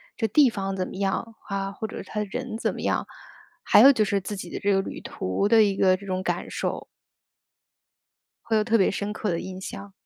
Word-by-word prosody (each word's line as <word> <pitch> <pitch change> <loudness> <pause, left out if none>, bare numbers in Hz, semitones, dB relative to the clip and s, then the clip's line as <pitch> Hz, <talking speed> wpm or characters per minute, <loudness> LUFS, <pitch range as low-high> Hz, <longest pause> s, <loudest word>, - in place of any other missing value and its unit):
这 225 - 0
地 260 +4 +5
方 195 -2 -3
怎 185 - -1
么 - - -9
样， 195 +3 -2
啊， 195 -1 -2
或 220 +2 -5
者 - - -7
它 210 - -5
的 210 - -2
人 250 +1 -4
怎 - - 0
么 - - -6
样， - - 0 0.6
还 - - +6
有 275 - +10
就 220 -6 +2
是 200 0 0
自 205 +3 -5
己 175 -2 -7
的 - - -4
这 205 - +1
个 195 -1 +2
旅 - - -7
途 95 - -2
的 220 +1 +6
一 200 -2 +1
个 185 -1 +3
这 200 - -12
种 185 -1 -2
感 - - -3
受。 - - -3 1.6
会 225 -1 0
有 215 - +2
特 230 +1 +3
别 195 - +3
深 205 +1 -3
刻 215 0 -3
的 170 -2 -1
印 185 0 -7
象。 195 +1 -8
200 Hz, 250 characters per minute, -25 LUFS, 195-220 Hz, 1.6 s, 有